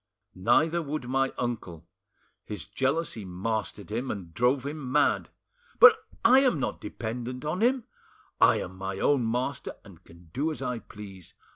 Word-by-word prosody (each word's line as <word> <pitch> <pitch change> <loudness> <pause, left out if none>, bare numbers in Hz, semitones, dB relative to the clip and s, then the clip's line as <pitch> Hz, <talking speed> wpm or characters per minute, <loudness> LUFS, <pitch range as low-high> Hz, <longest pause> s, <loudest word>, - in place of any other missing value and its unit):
Neither 150 - +2
would 150 -4 -4
my 135 +1 +1
uncle; 95 -9 -4 0.6
his 105 -5 -6
jealousy 135 -4 -1
mastered 100 +2 -4
him 120 +4 -2
and 90 -5 -6
drove 125 +6 +2
him 145 -3 -5
mad— 145 +1 +2 0.5
"But 465 -1 +10 0.3
I 255 +3 +8
am 255 - +3
not - - -3
dependent 125 +3 -5
on 165 +6 -2
him; 250 +1 +3 0.6
I - - +5
am 95 +1 -7
my 95 0 -4
own 125 0 +2
master, 125 +2 -2
and - - -15
can 85 0 -17
do 150 +4 0
as 155 - -5
I 125 -3 -3
please. 100 -4 -12
125 Hz, 155 wpm, -28 LUFS, 100-150 Hz, 0.6 s, But